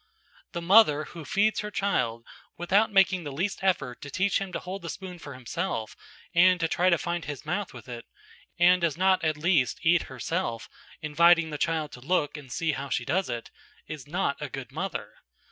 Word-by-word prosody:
The 170 - -4
mother 175 -6 +6
who 165 +1 -9
feeds 205 +8 +1
her 210 - -3
child 115 - -1 0.3
without 195 +6 +2
making 190 -2 +4
the 145 - -5
least 180 +9 -2
effort 145 -10 0
to 145 - -7
teach 195 +7 +1
him 195 -1 -4
to - - -3
hold 190 +2 -6
the 170 - -6
spoon 180 -1 -7
for 140 -4 -9
himself 130 - -4 0.4
and 180 +1 +5
to 165 - +1
try 180 +3 +2
to 170 - +4
find 170 0 -3
his 145 0 -6
mouth 190 +5 -2
with 120 -3 -12
it, 120 -1 -8 0.5
and 180 +1 +5
who 170 - +4
does 160 - -6
not 190 0 +3
at 155 -1 +1
least 155 -5 +2
eat 170 +1 +5
herself, 130 -2 -3 0.4
inviting 170 +2 +4
the 150 - -5
child 160 -2 -1
to 125 - -11
look 150 +1 0
and 140 -4 -10
see 160 +4 0
how 140 -1 -5
she 125 - -1
does 185 +7 0
it, 120 -1 -5 0.3
is 150 -3 -8
not 155 -3 -1
a 145 - -4
good 135 -2 -7
mother. - - -4
170 Hz, 205 wpm, -27 LUFS, 140-185 Hz, 0.5 s, mother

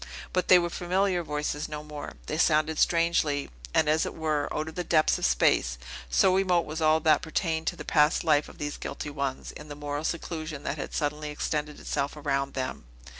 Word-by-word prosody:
But 185 - +1
they 185 - +8
were 175 -1 0
familiar 185 +1 +1
voices 150 -1 -3
no 150 0 -5
more; 150 -1 -7
they 155 - -3
sounded 155 -1 +3
strangely, 165 - +2 0.2
and, 150 - +3
as 155 +1 +3
it - - -4
were, 155 -2 -1
out 155 +1 -2
of 160 - -6
the 180 - -3
depths 155 -3 +3
of - - +2
space; 60 0 +2 0.3
so 185 - +4
remote 180 -3 +2
was 160 +2 -5
all 155 0 +4
that 155 0 +4
pertained 160 -1 -2
to - - 0
the - - -8
past 150 +2 +3
life 150 -3 +3
of - - -14
these 145 0 -4
guilty 150 - -5
ones, 140 -2 -3
in 150 - -11
the 145 - -7
moral 145 0 -4
seclusion 160 -2 -4
that 145 - -3
had - - -5
suddenly 150 0 -2
extended 150 0 -3
itself 140 +2 -2
around 140 -2 -1
them. 130 - -4
155 Hz, 205 wpm, -28 LUFS, 145-165 Hz, 0.3 s, they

